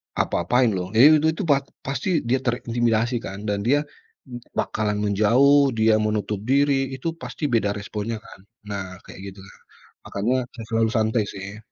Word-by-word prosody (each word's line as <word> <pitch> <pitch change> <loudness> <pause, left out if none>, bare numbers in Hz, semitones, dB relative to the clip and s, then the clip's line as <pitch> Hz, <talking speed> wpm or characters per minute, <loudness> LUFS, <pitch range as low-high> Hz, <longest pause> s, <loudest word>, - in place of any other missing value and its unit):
apa-apain 120 +7 +1
loh." 90 -2 -3
Iya, 150 +6 +7
itu 160 - +1
itu 200 - -3
pa 145 -5 +3 0.2
pasti 140 +5 -1
dia 125 +3 +1
terintimidasi, 120 -1 0
kan, 100 -2 -8
dan 105 -1 -1
dia 145 +3 +3 0.5
m 120 - -6 0.2
bakalan 105 -1 -1
menjauh, 125 +6 +4
dia 110 0 +4
menutup 105 -1 -1
diri, 135 -1 +2
itu 130 +5 -6
pasti - - -8
beda 115 -3 +2
responnya, 105 +2 -4
kan. - - -14 0.3
Nah 100 -2 -3 0.2
kayak - - -12
gitu 95 - -16
nah, 95 - -16 0.5
makanya 110 +6 -1 0.2
saya 115 -2 -8
selalu 115 0 +2
santai, 110 0 +1
sih. 100 +1 -8
115 Hz, 165 wpm, -23 LUFS, 105-130 Hz, 0.5 s, Iya